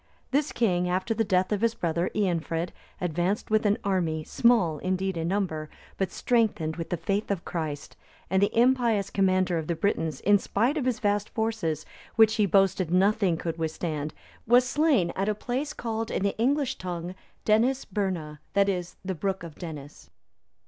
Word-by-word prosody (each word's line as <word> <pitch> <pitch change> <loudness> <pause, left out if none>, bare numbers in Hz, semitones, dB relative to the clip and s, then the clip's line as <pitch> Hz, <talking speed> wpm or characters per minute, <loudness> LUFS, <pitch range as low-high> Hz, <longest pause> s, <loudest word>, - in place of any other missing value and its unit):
This 285 +2 +1
king, 180 -6 +1
after 185 +5 0
the 225 - +1
death 185 -1 +1
of 210 -1 0
his 230 0 +2
brother 170 -3 -1
Eanfrid,(288) 170 -4 -1 0.3
advanced 180 +5 -1
with 215 0 +3
an 205 - +3
army, 170 -5 0
small, 185 -8 +3
indeed, 185 +2 -1
in 165 0 -2
number, 170 -5 -1 0.3
but 190 - 0
strengthened 215 -10 +1
with 165 - -5
the 175 - -1
faith 195 +6 -1
of 195 -4 -2
Christ; 155 -4 -4 0.3
and 190 +2 +1
the 205 +3 +2
impious 235 -5 +3
commander 185 -3 +2
of 155 - -5
the 170 - 0
Britons, 160 -6 -1
in 205 +1 +5
spite 235 +11 0
of 290 -5 -1
his 255 -3 +1
vast 205 -1 0
forces, 220 -9 -2 0.3
which 220 -1 +5
he 210 -2 +3
boasted 190 -2 +3
nothing 190 0 +3
could 165 0 -4
withstand, 155 -2 -2 0.4
was 245 +2 +5
slain 275 - +2
at 195 +2 0
a 210 - 0
place 255 +7 -3
called 225 -1 -3
in - - -1
the 200 - 0
English 275 +3 +1
tongue 175 -1 -4 0.3
Denisesburna, 205 - 0
that 200 0 +4
is, 180 -2 -3
the 190 - -1
brook 190 +2 -2
of 165 -2 -8
Denis. 150 -4 -9
190 Hz, 175 wpm, -27 LUFS, 170-220 Hz, 0.4 s, in